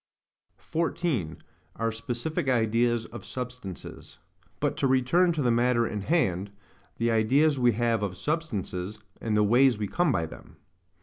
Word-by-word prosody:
14. 160 - -2 0.4
Our 115 0 -1
specific 120 +6 -3
Ideas 120 -1 +2
of 120 - -9
Substances. 125 -7 -7 0.4
But - - 0
to 135 - +2
return 130 +8 +3
to 155 -3 -1
the 120 - +3
matter 120 0 +3
in 105 -2 -3
hand,—the 100 - -2
ideas 135 +7 +3
we 120 -1 +4
have 115 0 +1
of 95 -3 -3
substances, 105 - -3 0.2
and 110 -2 0
the 105 - +4
ways 120 +3 +4
we 105 -1 -2
come 175 - +1
by 85 -9 0
them. - - -12
120 Hz, 140 wpm, -27 LUFS, 105-135 Hz, 0.4 s, we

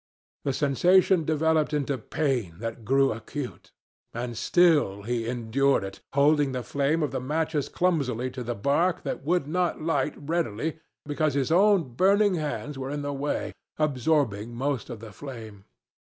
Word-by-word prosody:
The 140 - +2
sensation 175 +5 +3
developed 155 0 +1
into 140 -2 -1
pain 125 - -1
that 115 +2 -6
grew 135 +4 +3
acute. 125 +4 -7 0.4
And 120 0 -4
still 145 - +3
he 115 0 -2
endured 125 +2 +1
it, 95 0 -7
holding 145 0 +3
the 125 -1 -3
flame 145 +5 0
of 150 - -1
the 130 - -2
matches 150 +2 -1
clumsily 130 -9 0
to 130 0 -6
the 120 0 -3
bark 160 - +1
that - - -4
would 175 +1 +1
not 175 +3 0
light 150 -3 0
readily 155 -1 -2 0.3
because 145 -1 0
his 140 +2 0
own 185 - +4
burning 200 - +4
hands 150 -3 -3
were 130 0 -4
in 145 0 -3
the 145 0 -2
way, 140 +1 -2 0.2
absorbing 130 -7 0
most 135 0 -2
of 115 -3 -7
the 110 -2 -9
flame. 110 -6 -9
140 Hz, 155 wpm, -26 LUFS, 120-160 Hz, 0.4 s, own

